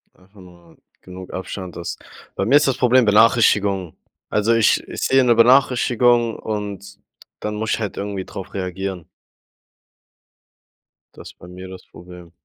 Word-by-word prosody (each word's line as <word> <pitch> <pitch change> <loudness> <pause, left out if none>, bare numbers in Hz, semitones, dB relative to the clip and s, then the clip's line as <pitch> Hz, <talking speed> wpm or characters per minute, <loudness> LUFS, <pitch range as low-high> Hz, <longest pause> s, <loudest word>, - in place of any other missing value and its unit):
Einfach 95 +2 -20
nur 85 -2 -18 0.2
genug 90 0 -11
Abstand, 95 -1 -7
dass 85 -1 -6 0.4
Bei 95 - -2
mir 130 - +3
ist 150 - +2
das 135 - 0
Problem 125 0 +3
Benachrichtigungen. 105 -4 +3 0.3
Also 105 +2 +1
ich 115 -1 +2
ich - - -7
sehe 135 0 +3
'ne 120 -2 +3
Benachrichtigung, 120 -1 +3
und 100 -2 -6 0.4
dann 105 0 -4
muss 110 +1 -3
ich - - 0
halt 105 -3 -5
irgendwie 100 -2 -5
drauf 95 -2 -9
reagieren. 95 -1 -5 2.1
Das - - -12
ist - - -31
bei 90 - -13
mir 90 +1 -10
das 95 0 -12
Problem. 90 -1 -14
100 Hz, 150 wpm, -20 LUFS, 95-115 Hz, 2.1 s, mir